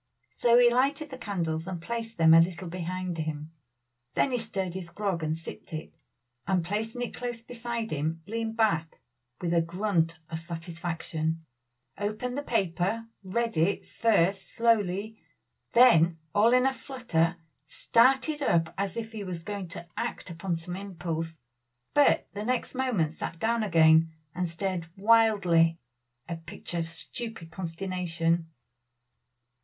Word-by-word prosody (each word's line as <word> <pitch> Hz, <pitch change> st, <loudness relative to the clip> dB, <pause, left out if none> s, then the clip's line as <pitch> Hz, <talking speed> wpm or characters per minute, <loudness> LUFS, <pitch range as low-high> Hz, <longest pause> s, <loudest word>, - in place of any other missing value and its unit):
So 235 Hz, 0 st, +4 dB
he 240 Hz, -1 st, +7 dB
lighted 280 Hz, +4 st, +1 dB
the 260 Hz, -, -6 dB
candles 170 Hz, -6 st, -2 dB
and 185 Hz, -2 st, -4 dB
placed 230 Hz, +5 st, -4 dB
them 160 Hz, -1 st, +7 dB
a 165 Hz, -, +9 dB
little 180 Hz, +1 st, -1 dB
behind 180 Hz, 0 st, -4 dB
him. 155 Hz, 0 st, -4 dB, 0.6 s
Then 270 Hz, -, +2 dB
he 245 Hz, -, +1 dB
stirred 195 Hz, -5 st, -3 dB
his 180 Hz, -2 st, -5 dB
grog 195 Hz, -3 st, -2 dB
and 155 Hz, 0 st, -1 dB
sipped 165 Hz, -, -9 dB
it, 155 Hz, 0 st, -6 dB, 0.5 s
and 180 Hz, -3 st, +1 dB
placing 220 Hz, +6 st, -2 dB
it 245 Hz, -, -4 dB
close 240 Hz, -2 st, -5 dB
beside 235 Hz, -1 st, -4 dB
him, 155 Hz, +2 st, -2 dB
leaned 225 Hz, +1 st, -3 dB
back 165 Hz, -8 st, +1 dB, 0.4 s
with 175 Hz, -1 st, 0 dB
a 170 Hz, -, +4 dB
grunt 170 Hz, -1 st, 0 dB
of 160 Hz, -, -3 dB
satisfaction, 165 Hz, -1 st, -3 dB, 0.5 s
opened 215 Hz, +5 st, -2 dB
the 285 Hz, -, -1 dB
paper, 200 Hz, -, 0 dB, 0.2 s
read 230 Hz, +3 st, -1 dB
it 170 Hz, +5 st, +1 dB
first 195 Hz, -4 st, +1 dB
slowly, 220 Hz, -2 st, +1 dB, 0.5 s
then 170 Hz, -10 st, +6 dB, 0.2 s
all 215 Hz, +3 st, +5 dB
in 250 Hz, +1 st, +5 dB
a 265 Hz, -, +3 dB
flutter, 185 Hz, -, 0 dB, 0.3 s
started 265 Hz, -, +3 dB
up 165 Hz, -10 st, +2 dB
as 200 Hz, 0 st, -2 dB
if 225 Hz, -1 st, -4 dB
he 215 Hz, -2 st, -5 dB
was 175 Hz, -3 st, -4 dB
going 200 Hz, -1 st, -4 dB
to 170 Hz, 0 st, -7 dB
act -, -, -3 dB
upon 170 Hz, +1 st, -2 dB
some 165 Hz, +2 st, -6 dB
impulse; 165 Hz, -4 st, -4 dB, 0.6 s
but 290 Hz, -1 st, +4 dB
the 205 Hz, -, -4 dB
next 250 Hz, +2 st, -1 dB
moment 240 Hz, -, 0 dB
sat 165 Hz, +1 st, -5 dB
down 230 Hz, +4 st, +1 dB
again 160 Hz, -4 st, +5 dB, 0.2 s
and 180 Hz, -1 st, -1 dB
stared 175 Hz, 0 st, -3 dB
wildly 195 Hz, -7 st, +4 dB, 0.5 s
a 170 Hz, -2 st, -4 dB
picture 165 Hz, +1 st, -5 dB
of 165 Hz, -, -2 dB
stupid 180 Hz, +1 st, -5 dB
consternation. 170 Hz, -1 st, -1 dB
185 Hz, 145 wpm, -28 LUFS, 165-225 Hz, 0.6 s, a